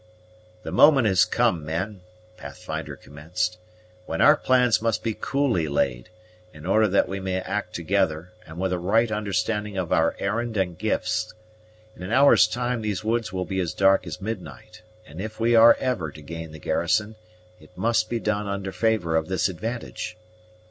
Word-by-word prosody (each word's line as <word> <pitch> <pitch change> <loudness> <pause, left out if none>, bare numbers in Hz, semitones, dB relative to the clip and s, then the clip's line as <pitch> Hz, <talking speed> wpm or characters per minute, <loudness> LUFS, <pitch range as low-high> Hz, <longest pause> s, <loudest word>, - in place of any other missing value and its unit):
"The - - -6
moment 140 -5 +6
has 95 -4 +4
come, 80 -3 +1
men," 90 +6 -4 0.3
Pathfinder - - -7
commenced, 90 +6 -4 0.5
"when 80 - -3
our 150 - +7
plans 125 -6 +2
must 115 -2 -1
be 115 - -1
coolly 125 - 0
laid, 65 -3 -1 0.5
in 75 +1 -11
order 110 +4 +3
that 100 -1 +2
we 95 +2 -4
may 95 -1 -2
act 95 -2 -4
together, 85 -1 -1
and 80 +1 -11
with 95 0 -1
a 90 - -1
right 110 +6 +2
understanding 105 0 -2
of 90 -3 -1
our 80 +1 +2
errand 115 +2 -2
and 90 -3 -1
gifts. - - -2 0.6
In - - -14
an 90 +3 -6
hour's 130 -3 +6
time 120 +1 -2
these 105 -1 -3
woods 110 0 -1
will 95 -1 -3
be 95 -1 -3
as 85 -4 -2
dark 95 -1 +3
as 85 - -6
midnight; 95 - -7 0.2
and 80 +5 -9
if 110 +1 -7
we 115 +1 +2
are 115 0 +8
ever 125 -12 -2
to 75 - -12
gain 80 +1 -7
the 80 - -10
garrison, 105 +8 0 0.4
it - - -18
must 110 +2 +1
be 120 - -1
done 105 -1 -1
under 100 -1 -4
favor 110 -7 0
of 80 -1 0
this 95 +1 0
advantage. 110 +3 -5
95 Hz, 175 wpm, -24 LUFS, 85-110 Hz, 0.6 s, are